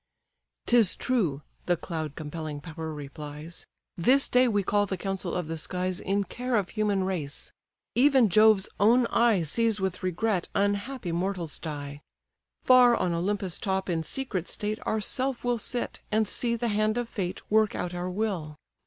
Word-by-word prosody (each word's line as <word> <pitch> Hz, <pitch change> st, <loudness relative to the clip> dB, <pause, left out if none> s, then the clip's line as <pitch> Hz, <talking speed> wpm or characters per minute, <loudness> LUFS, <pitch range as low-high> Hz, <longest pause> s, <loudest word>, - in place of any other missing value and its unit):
"'Tis 235 Hz, -6 st, +5 dB
true 175 Hz, -, 0 dB, 0.2 s
(the 175 Hz, -1 st, +2 dB
cloud 155 Hz, -4 st, -5 dB
compelling 155 Hz, -1 st, -5 dB
power 160 Hz, 0 st, -6 dB
replies) 150 Hz, +2 st, -8 dB, 0.3 s
This 260 Hz, +11 st, +3 dB
day 250 Hz, +1 st, +4 dB
we 205 Hz, -4 st, +1 dB
call 205 Hz, +2 st, +1 dB
the 190 Hz, -, -3 dB
council 195 Hz, 0 st, -3 dB
of 180 Hz, -3 st, -2 dB
the 165 Hz, 0 st, -4 dB
skies 180 Hz, +3 st, -2 dB
In 200 Hz, +1 st, 0 dB
care 250 Hz, +6 st, -3 dB
of 200 Hz, -5 st, +1 dB
human 210 Hz, -3 st, 0 dB
race; 165 Hz, -7 st, -4 dB, 0.4 s
even 265 Hz, -2 st, +5 dB
Jove's 215 Hz, 0 st, +5 dB
own 235 Hz, +4 st, +5 dB
eye 230 Hz, -7 st, +3 dB
Sees 225 Hz, +7 st, +1 dB
with 190 Hz, -1 st, -2 dB
regret 185 Hz, +1 st, -1 dB
unhappy 205 Hz, +1 st, -1 dB
mortals 175 Hz, -3 st, -2 dB
die. 145 Hz, -2 st, -6 dB, 0.6 s
Far 250 Hz, -2 st, +7 dB
on 180 Hz, -6 st, 0 dB
Olympus' 190 Hz, +1 st, -1 dB
top 190 Hz, -1 st, -1 dB
in 165 Hz, -1 st, 0 dB
secret 190 Hz, -, -3 dB
state 215 Hz, +1 st, -3 dB
Ourself 250 Hz, +4 st, -1 dB
will 245 Hz, -1 st, +1 dB
sit, 240 Hz, +3 st, -3 dB
and 215 Hz, 0 st, +2 dB
see 235 Hz, +3 st, -1 dB
the 235 Hz, 0 st, -1 dB
hand 215 Hz, +1 st, +1 dB
of 240 Hz, -1 st, -1 dB
fate 185 Hz, -5 st, -4 dB
Work 215 Hz, -1 st, +3 dB
out 180 Hz, -, -3 dB
our 175 Hz, +1 st, -3 dB
will. 180 Hz, -6 st, -2 dB
195 Hz, 160 wpm, -27 LUFS, 170-225 Hz, 0.6 s, Far